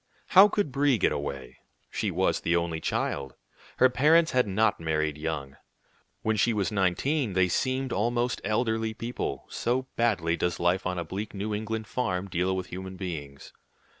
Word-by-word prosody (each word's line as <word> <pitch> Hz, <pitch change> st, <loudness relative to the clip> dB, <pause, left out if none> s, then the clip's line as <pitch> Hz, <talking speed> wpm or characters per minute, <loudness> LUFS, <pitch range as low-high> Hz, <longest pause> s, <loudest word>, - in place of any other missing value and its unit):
How 195 Hz, +2 st, +9 dB
could 205 Hz, -7 st, -1 dB
Brie 140 Hz, -1 st, +3 dB
get -, -, +2 dB
away? 70 Hz, -2 st, -5 dB, 0.3 s
She -, -, -1 dB
was -, -, +1 dB
the 85 Hz, -, +1 dB
only 85 Hz, -1 st, -1 dB
child. 70 Hz, -4 st, -2 dB, 0.4 s
Her 130 Hz, -, +7 dB
parents 160 Hz, +6 st, +4 dB
had 125 Hz, -3 st, +2 dB
not 105 Hz, +3 st, +2 dB
married 80 Hz, -2 st, -1 dB
young. 75 Hz, -3 st, -4 dB, 0.7 s
When 110 Hz, 0 st, +1 dB
she 115 Hz, +3 st, +3 dB
was 105 Hz, -2 st, 0 dB
nineteen, 105 Hz, -, +1 dB
they 95 Hz, 0 st, +3 dB
seemed 130 Hz, +6 st, -1 dB
almost 120 Hz, +4 st, 0 dB
elderly 110 Hz, +1 st, 0 dB
people, 120 Hz, +2 st, -4 dB
so 125 Hz, +2 st, -1 dB
badly 95 Hz, -8 st, +2 dB
does 90 Hz, 0 st, -1 dB
life 90 Hz, +2 st, +1 dB
on 90 Hz, 0 st, -2 dB
a 85 Hz, -, -3 dB
bleak 100 Hz, +5 st, -5 dB
New 105 Hz, +2 st, -3 dB
England 110 Hz, +1 st, -3 dB
farm 105 Hz, -5 st, -2 dB
deal 90 Hz, +1 st, 0 dB
with 95 Hz, -, -3 dB
human 95 Hz, +1 st, -6 dB
beings. 75 Hz, -7 st, -7 dB
100 Hz, 165 wpm, -27 LUFS, 85-120 Hz, 0.7 s, How